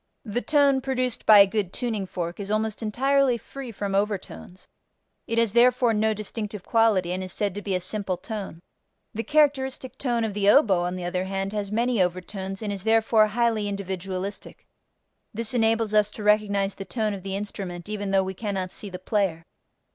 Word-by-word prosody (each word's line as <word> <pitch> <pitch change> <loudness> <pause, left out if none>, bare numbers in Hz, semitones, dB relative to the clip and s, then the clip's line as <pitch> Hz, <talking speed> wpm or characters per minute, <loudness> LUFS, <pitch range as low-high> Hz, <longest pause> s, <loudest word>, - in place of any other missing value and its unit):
The 225 +2 -2
tone 285 -3 +3
produced 255 -2 -2
by 215 - +9
a 200 - +9
good 195 -2 -2
tuning 220 -5 -3
fork 175 0 -5
is 200 0 -5
almost 215 +1 -1
entirely 260 +3 +2
free 260 +2 -9
from 200 -2 -4
overtones: 195 -2 -3 0.6
it 230 - -2
has 230 -3 +2
therefore 240 0 +4
no 215 0 +1
distinctive 210 -1 -5
quality 215 -7 +2
and 185 +1 -2
is 185 - -5
said 200 0 -1
to 205 - -5
be 200 -2 -2
a - - +1
simple 185 0 -2
tone. 195 -6 -7 0.5
The 225 - -2
characteristic 265 -3 +1
tone 240 -4 0
of 220 -2 -2
the 200 0 +2
oboe 205 - +5
on 180 +1 -2
the 180 -1 -5
other 180 +1 -2
hand 195 +1 -3
has 205 -1 -3
many 235 0 +1
overtones 190 +3 -3
and 205 -1 -2
is 195 -2 -6
therefore 225 0 +4
highly 225 -1 0
individualistic: 195 0 -5 0.7
this 230 +1 -1
enables 225 -2 +2
us 210 -1 +4
to 215 - -6
recognize 205 -2 +2
the 195 - -7
tone 215 -2 -1
of 195 - -6
the 195 +1 -4
instrument 195 -3 -6
even 205 -1 -4
though 195 0 +3
we 190 0 -4
cannot 190 -2 -3
see 205 - -5
the 180 - -6
player. 185 -4 -1
210 Hz, 190 wpm, -25 LUFS, 195-230 Hz, 0.7 s, by